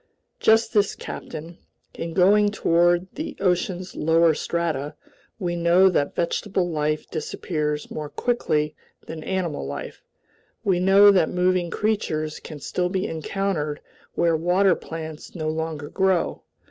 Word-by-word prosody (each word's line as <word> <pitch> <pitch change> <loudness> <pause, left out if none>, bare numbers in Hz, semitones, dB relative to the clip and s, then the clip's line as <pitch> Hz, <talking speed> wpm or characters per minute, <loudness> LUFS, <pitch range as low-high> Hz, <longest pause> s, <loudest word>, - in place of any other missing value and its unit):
"Just 225 +1 +3
this, 205 -2 +2
captain. 165 +3 -8 0.3
In 165 0 -6
going 205 +3 +5
toward 175 -2 +2
the 310 - -5
ocean's 180 0 -1
lower 165 +1 +4
strata, 155 -3 -2 0.4
we 175 -4 -2
know 175 +3 +5
that 145 -6 0
vegetable 180 +2 0
life 155 -2 -1
disappears 150 -2 -3
more 150 -1 -5
quickly 150 -5 0 0.3
than 160 -1 -7
animal 180 - -2
life. 70 +1 -6 0.6
We 185 -3 +2
know 195 +2 +7
that 185 -5 +3
moving 180 -1 +1
creatures 160 -8 -1
can 155 -2 -9
still 180 +5 -1
be 190 +1 -1
encountered 160 -3 -2 0.4
where 170 -1 +2
water 180 +4 +3
plants 160 -1 -7
no 155 -2 -2
longer 160 -2 -3
grow. 190 -1 0
170 Hz, 130 wpm, -24 LUFS, 155-190 Hz, 0.6 s, know